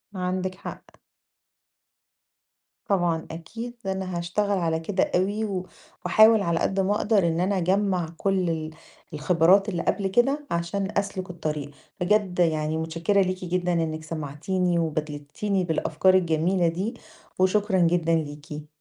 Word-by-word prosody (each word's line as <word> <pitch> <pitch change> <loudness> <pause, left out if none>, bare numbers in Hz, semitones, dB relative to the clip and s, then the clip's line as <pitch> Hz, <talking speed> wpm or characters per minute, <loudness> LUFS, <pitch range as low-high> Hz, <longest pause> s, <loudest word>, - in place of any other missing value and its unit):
عَندِك 185 0 -2
حق. 195 - -8 2.0
طبعًا 175 -5 +1
أكيد 225 +9 -7
أنا 190 -2 -3
هاشتغل 200 +4 0
على 165 -2 0
كده 185 +4 -1
أوي 200 +4 +1
و 185 -3 -4 0.4
واحاول 220 0 +6
على 170 -3 0
قد 195 - 0
ما 195 +2 +2
اقدر 205 -4 +2
إن 165 0 0
أنا 190 +2 +1
اجمّع 185 -1 +1
كل 190 -2 +1
ال 160 -1 -2 0.4
الخبرات 180 +6 +3
اللي 175 -4 -2
قبل 200 -2 0
كده 270 +9 +1
عشان 170 +4 -1
أسلُك 195 -2 -2
الطريق. 155 -4 -4 0.3
بجد 190 -1 +1
يعني 155 -2 +1
مُتشكّرة 165 +5 +1
ليكِ 185 -1 -2
جدًا 180 0 0
إنِك 160 -2 -1
سمعتينِي 165 +4 -1
وبادلتينِي 155 +5 -2
بالأفكار 165 +2 +2
الجميلة 175 0 +2
دي 185 +8 -2 0.5
وشكرًا 190 +1 +2
جدًا 170 -1 +3
ليكِ. 150 0 -5
180 Hz, 130 wpm, -25 LUFS, 165-195 Hz, 2.0 s, واحاول